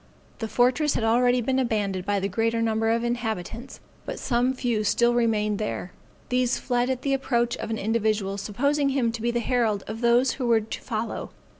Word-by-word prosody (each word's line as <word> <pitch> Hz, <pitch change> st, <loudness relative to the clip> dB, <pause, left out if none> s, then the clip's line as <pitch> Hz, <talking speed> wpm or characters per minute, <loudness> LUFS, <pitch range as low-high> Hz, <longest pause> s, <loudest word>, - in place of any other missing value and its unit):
The 225 Hz, -, -3 dB
fortress 250 Hz, +7 st, +2 dB
had -, -, 0 dB
already 245 Hz, +2 st, +3 dB
been 260 Hz, +3 st, 0 dB
abandoned 205 Hz, -7 st, -1 dB
by 205 Hz, -1 st, +1 dB
the 195 Hz, -, -1 dB
greater 225 Hz, +3 st, 0 dB
number 225 Hz, 0 st, +1 dB
of 230 Hz, +1 st, +2 dB
the 240 Hz, -, -1 dB
inhabitants, 230 Hz, +1 st, -4 dB, 0.2 s
but -, -, -5 dB
some 245 Hz, 0 st, +1 dB
few 235 Hz, -4 st, 0 dB
still 235 Hz, +3 st, +3 dB
remained 215 Hz, -3 st, +1 dB
there. 210 Hz, -3 st, -3 dB, 0.4 s
These 250 Hz, 0 st, +1 dB
fled 245 Hz, 0 st, 0 dB
at 260 Hz, -1 st, -2 dB
the 275 Hz, -, +1 dB
approach 240 Hz, -3 st, 0 dB
of -, -, -5 dB
an 220 Hz, -, -2 dB
individual 215 Hz, -2 st, 0 dB
supposing 280 Hz, +8 st, 0 dB
him 260 Hz, -4 st, +1 dB
to 230 Hz, -1 st, -6 dB
be 235 Hz, -, 0 dB
the 240 Hz, 0 st, 0 dB
herald 230 Hz, -5 st, 0 dB
of 225 Hz, +2 st, -6 dB
those 240 Hz, +2 st, +4 dB
who 255 Hz, -3 st, -3 dB
were 230 Hz, -2 st, +4 dB
to 215 Hz, -, -7 dB
follow. 225 Hz, 0 st, -4 dB
235 Hz, 200 wpm, -25 LUFS, 220-245 Hz, 0.4 s, those